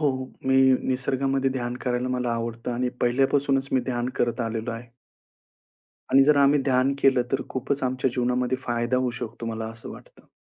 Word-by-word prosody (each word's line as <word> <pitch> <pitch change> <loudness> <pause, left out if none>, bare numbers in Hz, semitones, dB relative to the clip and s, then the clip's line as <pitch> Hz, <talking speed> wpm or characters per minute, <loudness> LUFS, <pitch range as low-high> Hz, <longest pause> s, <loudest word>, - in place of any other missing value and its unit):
हो, 150 - +3 0.4
मी 130 - +3 0.3
निसर्गामध्ये 135 +1 0
ध्यान 120 -2 -3
करायला 125 0 -1
मला 125 -1 -1
आवडतं. 115 +1 -3
आणि 125 +1 -1
पहिल्यापासूनच 135 +2 +2
मी 130 - +3
ध्यान 120 -1 -2
करत 120 0 0
आलेलो 115 0 -3
आहे. 115 +1 -8 1.2
आणि 135 - +6
जर 150 +1 +4
आम्ही 140 +1 +5
ध्यान 130 0 +2
केलं 135 -2 +4
तर 135 - +1
खूपच 135 +2 -3
आमच्या 130 0 0
जीवनामध्ये 125 +1 0
फायदा 120 -1 -1
होऊ 125 -1 +1
शकतो, 115 0 -6
मला 110 -1 -4
असं 115 0 -10
वाटतं. - - -14
125 Hz, 165 wpm, -25 LUFS, 120-135 Hz, 1.2 s, आणि